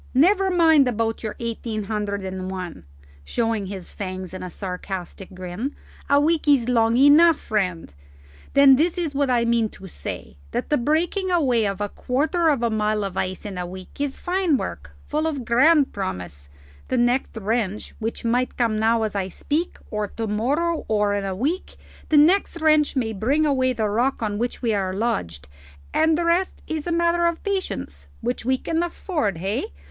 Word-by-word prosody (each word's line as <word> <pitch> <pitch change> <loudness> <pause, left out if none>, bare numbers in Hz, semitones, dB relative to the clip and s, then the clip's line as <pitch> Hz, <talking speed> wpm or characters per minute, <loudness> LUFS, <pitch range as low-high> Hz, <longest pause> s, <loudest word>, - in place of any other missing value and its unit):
Never 380 +7 +4
mind 320 -6 +5
about 225 -1 -1
your 215 -2 -4
eighteen 230 -2 -3
hundred 205 -1 -3
and 185 0 -4
one," 180 - -6 0.4
showing 225 - -1
his 190 -2 -7
fangs 185 -2 -6
in 185 - -6
a 185 - -5
sarcastic 185 +1 -6
grin; 185 +9 -5 0.3
"a 280 0 +5
week 310 +1 +1
is 275 -5 +4
long 230 -1 +3
enough, 295 +4 +7
friend. 180 - -2 0.6
Then 275 -1 +8
this 330 +5 +1
is 330 -5 -2
what 280 -1 +1
I 240 -2 +2
mean 230 -2 +2
to 195 - -13
say: 115 - -7 0.2
that - - -3
the 295 - +4
breaking 335 - 0
away 255 - +2
of 195 0 -3
a 205 - -1
quarter 310 - 0
of 275 -6 +1
a 235 - +1
mile 215 -1 0
of 195 -2 -4
ice 185 +1 -3
in 195 -3 -5
a 180 - -3
week 185 +8 -9
is 285 -2 -2
fine 360 -5 +1
work, 75 - -6
full 310 +1 0
of 280 -6 -3
grand 280 +5 +4
promise: 90 - -5 0.4
the 255 - 0
next 245 0 +1
wrench 215 -1 -2
which 225 +1 -4
might 245 +2 0
come 225 -3 +1
now 225 +1 +2
as 215 -2 -2
I 190 -2 -1
speak, 300 - -2
or 210 -1 -1
to 225 +3 -5
morrow, 285 +11 0
or 210 -1 +2
in 200 -1 -1
a 190 -1 -3
week 300 - -2 0.3
the 310 - +4
next 340 +3 +4
wrench 310 -2 +3
may 230 -4 0
bring 270 +10 +1
away 260 -3 +2
the 225 -3 -1
rock 235 +4 0
on 205 -1 -2
which 240 +2 -3
we 230 -2 +2
are 190 -2 -1
lodged, 85 - -2 0.5
and 315 0 +3
the 340 - 0
rest 350 +3 +1
is 315 0 -4
a - - -1
matter 340 0 +2
of 340 -1 -2
patience 90 - -3
which 245 +1 -2
we 260 +2 +2
can 325 +5 -1
afford, 320 - -2
hey? 190 - -3
235 Hz, 190 wpm, -23 LUFS, 200-300 Hz, 0.6 s, Then